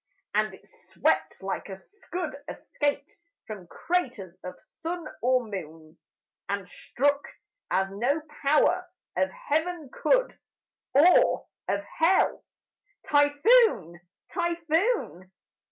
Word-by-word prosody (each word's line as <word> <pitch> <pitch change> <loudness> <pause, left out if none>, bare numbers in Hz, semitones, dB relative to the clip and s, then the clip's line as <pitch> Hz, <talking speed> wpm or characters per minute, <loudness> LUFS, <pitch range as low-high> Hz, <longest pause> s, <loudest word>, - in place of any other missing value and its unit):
And - - +1
it - - -21
swept 475 - -1
like 195 +1 -4
a 190 - -5
scud 355 - -6
escaped 290 0 -3 0.3
From 195 -5 -8
craters 245 - -2
of 180 0 -8
sun 335 0 -6 0.2
or 255 +1 +3
moon, 160 -6 -8 0.5
And 200 -2 -2
struck 285 +8 0 0.5
as 195 +1 +1
no 245 +10 0 0.2
power 350 +5 +3 0.3
of 190 +1 +2
Heaven 315 - -2
could, - - +1 0.6
Or 335 +6 +5 0.2
of 200 +1 0
Hell 330 - +2 0.6
typhoon! 290 - +4 0.3
typhoon! 340 - 0
285 Hz, 100 wpm, -27 LUFS, -, 0.6 s, Or